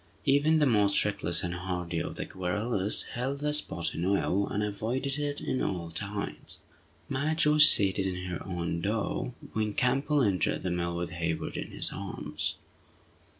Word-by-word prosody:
Even 145 Hz, +3 st, +3 dB
the 150 Hz, -, +3 dB
most 105 Hz, -6 st, +3 dB
reckless 100 Hz, -5 st, 0 dB
and 90 Hz, 0 st, -2 dB
hardy 90 Hz, -1 st, -3 dB
of -, -, -4 dB
the -, -, -4 dB
guerrillas 100 Hz, +3 st, -1 dB
held 130 Hz, +3 st, -2 dB
the 150 Hz, +1 st, -1 dB
spot 95 Hz, -, -1 dB
in 85 Hz, -, -4 dB
awe, 100 Hz, +1 st, +1 dB
and 105 Hz, -, -2 dB
avoided 125 Hz, +7 st, -2 dB
it 145 Hz, -1 st, -2 dB
at 130 Hz, -, -1 dB
all 85 Hz, -3 st, -3 dB
times. 100 Hz, +4 st, -6 dB, 0.5 s
Madge 150 Hz, +4 st, 0 dB
was 150 Hz, 0 st, +9 dB
seated 95 Hz, -1 st, +6 dB
in 90 Hz, -1 st, -4 dB
her 90 Hz, -1 st, -5 dB
own 85 Hz, -2 st, -3 dB
door 110 Hz, +5 st, -2 dB, 0.2 s
when 110 Hz, -1 st, -1 dB
Campbell 135 Hz, +3 st, +2 dB
entered 95 Hz, -6 st, 0 dB
the 90 Hz, -, -1 dB
mill 85 Hz, 0 st, -2 dB
with 85 Hz, -1 st, -4 dB
Hayward 85 Hz, -1 st, -3 dB
in -, -, -4 dB
his -, -, -1 dB
arms. -, -, -4 dB
100 Hz, 165 wpm, -29 LUFS, 90-130 Hz, 0.5 s, was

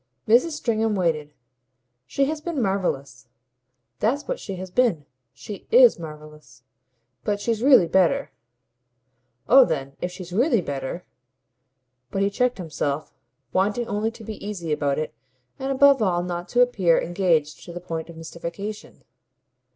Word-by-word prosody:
Mrs. 250 Hz, +9 st, +4 dB
Stringham 225 Hz, -6 st, 0 dB
waited. 160 Hz, -5 st, 0 dB, 0.8 s
"She 275 Hz, -, +1 dB
has 305 Hz, +2 st, -3 dB
been 330 Hz, -2 st, -3 dB
marvellous 140 Hz, -, -2 dB, 0.7 s
that's 265 Hz, +7 st, 0 dB
what -, -, -2 dB
she 195 Hz, -, -6 dB
has 185 Hz, 0 st, -7 dB
been. 200 Hz, -, +2 dB, 0.3 s
She 195 Hz, +9 st, -10 dB
IS -, -, +6 dB
marvellous. 150 Hz, -4 st, -11 dB, 0.6 s
But 205 Hz, -1 st, -1 dB
she's 225 Hz, +1 st, -1 dB
really 260 Hz, -8 st, +7 dB
better." 190 Hz, +11 st, +2 dB, 1.2 s
"Oh 265 Hz, +2 st, +8 dB
then 140 Hz, -, -3 dB
if 180 Hz, -, -2 dB
she's 180 Hz, -1 st, -9 dB
really 240 Hz, -, +3 dB
better 140 Hz, +1 st, -5 dB, 0.5 s
!" 125 Hz, -1 st, -52 dB
But 195 Hz, -, 0 dB
he 200 Hz, -, +1 dB
checked 250 Hz, +4 st, +1 dB
himself, 150 Hz, -4 st, -3 dB, 0.4 s
wanting 205 Hz, +5 st, +1 dB
only 215 Hz, 0 st, -1 dB
to 225 Hz, 0 st, -12 dB
be 215 Hz, 0 st, -8 dB
easy 190 Hz, -6 st, -4 dB
about 140 Hz, -2 st, 0 dB
it 155 Hz, -, -3 dB, 0.5 s
and 270 Hz, +1 st, -2 dB
above 275 Hz, -1 st, +5 dB
all 175 Hz, -4 st, +1 dB
not 175 Hz, 0 st, -5 dB
to 245 Hz, -, +3 dB
appear 195 Hz, -9 st, +3 dB
engaged 165 Hz, -4 st, 0 dB
to -, -, -9 dB
the 175 Hz, -, -6 dB
point 165 Hz, -2 st, -5 dB
of 165 Hz, -, -11 dB
mystification. 170 Hz, +6 st, -7 dB
185 Hz, 150 wpm, -24 LUFS, 160-230 Hz, 1.2 s, Oh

